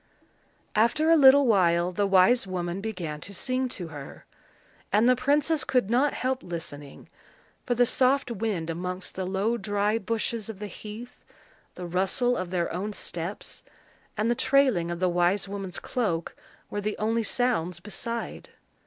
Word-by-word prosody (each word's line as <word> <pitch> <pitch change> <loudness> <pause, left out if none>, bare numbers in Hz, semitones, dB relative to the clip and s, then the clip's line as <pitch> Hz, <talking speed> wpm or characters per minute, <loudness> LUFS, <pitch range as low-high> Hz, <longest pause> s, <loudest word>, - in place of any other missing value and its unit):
After 300 +9 +3
a - - +8
little 280 -1 +7
while 175 -5 +3
the 200 +2 0
wise 195 +4 +4
woman 180 0 -3
began 175 -8 -5
to 200 - -8
sing 255 +3 -1
to 175 -8 -6
her, 145 -3 -10 0.7
and 215 +4 +4
the 255 - +5
princess 290 +4 +1
could 245 -5 +1
not 265 +5 +2
help 260 +1 -1
listening; 150 -5 -7 0.6
for 245 - +1
the 245 +1 +4
soft 255 +1 +2
wind 195 -7 -2
amongst 180 +2 -4
the 185 -1 -4
low 200 +5 0
dry 205 +1 0
bushes 230 +1 -2
of 220 - -6
the 210 - -6
heath, 215 +4 -9 0.5
the 180 - -6
rustle 190 +8 +1
of 185 -5 -3
their 175 -2 -1
own 200 +5 -3
steps, 175 0 -5 0.6
and 215 +3 +1
the - - +4
trailing 260 -9 +2
of 175 0 -4
the 185 - +2
wise 180 +3 +1
woman's 195 -2 -5
cloak, 185 -10 -2 0.4
were 205 - -2
the 210 +1 -3
only 225 +2 0
sounds 220 -8 0
beside. 230 +4 -5
205 Hz, 160 wpm, -27 LUFS, 180-245 Hz, 0.7 s, a